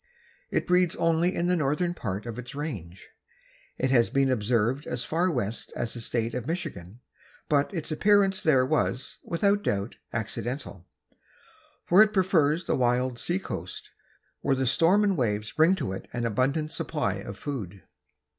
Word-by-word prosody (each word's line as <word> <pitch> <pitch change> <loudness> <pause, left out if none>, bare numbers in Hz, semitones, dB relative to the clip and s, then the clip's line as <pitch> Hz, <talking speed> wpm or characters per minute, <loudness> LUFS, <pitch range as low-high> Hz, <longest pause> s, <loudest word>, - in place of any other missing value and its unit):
It - - 0
breeds 180 -1 +3
only 165 +2 +2
in 170 - 0
the 180 +1 +2
northern 165 +3 0
part 100 - -4
of 120 0 -5
its 125 +2 -8
range. 100 - -6 0.7
It 130 0 0
has 120 -3 +4
been 135 -1 +2
observed 120 +3 0
as 125 0 -2
far 170 +6 +1
west 120 - -3
as 115 - -3
the 120 - -6
state 115 0 -2
of 125 0 -4
Michigan, 115 - -5 0.5
but 145 -1 +2
its 165 -5 -3
appearance 195 +3 +3
there 135 -5 +4
was, 135 -2 -1
without 200 +4 +1
doubt, 100 - -2
accidental, 115 - -4 1.0
for 185 +4 +6
it 215 0 +5
prefers 170 -4 +2
the - - +1
wild 125 0 +1
sea 175 +8 0
coast, 195 - -7 0.5
where 135 - +1
the 130 0 0
storm 165 - +4
and 200 -2 +2
waves 110 -4 -1
bring 165 +4 +4
to 140 - -3
it 95 - -6
an 120 -1 -2
abundant 135 +7 0
supply 150 - -1
of 100 0 -8
food. 100 - -6
135 Hz, 165 wpm, -27 LUFS, 115-170 Hz, 1.0 s, for